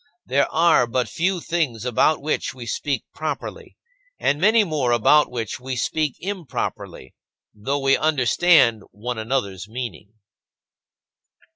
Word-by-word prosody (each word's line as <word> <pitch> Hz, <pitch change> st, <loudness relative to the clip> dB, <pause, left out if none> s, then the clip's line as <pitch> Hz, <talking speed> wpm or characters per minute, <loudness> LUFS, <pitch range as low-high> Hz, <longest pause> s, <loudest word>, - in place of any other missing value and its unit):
There 140 Hz, +2 st, +1 dB
are 160 Hz, -6 st, +4 dB
but 125 Hz, 0 st, -1 dB
few 180 Hz, -, -1 dB
things 145 Hz, -11 st, -2 dB
about 135 Hz, +5 st, +2 dB
which 155 Hz, -2 st, -2 dB
we 125 Hz, -2 st, -8 dB
speak 135 Hz, +3 st, -2 dB
properly 155 Hz, 0 st, -6 dB, 0.4 s
and 145 Hz, -, 0 dB
many 215 Hz, +3 st, +5 dB
more 150 Hz, -9 st, -1 dB
about 135 Hz, +6 st, +4 dB
which 115 Hz, -2 st, -4 dB
we 130 Hz, +1 st, -5 dB
speak 150 Hz, +3 st, -1 dB
improperly 180 Hz, -, -5 dB, 0.4 s
though 120 Hz, +7 st, -2 dB
we 135 Hz, -1 st, +3 dB
understand 145 Hz, -4 st, +3 dB
one 115 Hz, +4 st, -5 dB
another's 105 Hz, -5 st, -2 dB
meaning. 110 Hz, -4 st, -7 dB
130 Hz, 125 wpm, -22 LUFS, 115-155 Hz, 0.4 s, many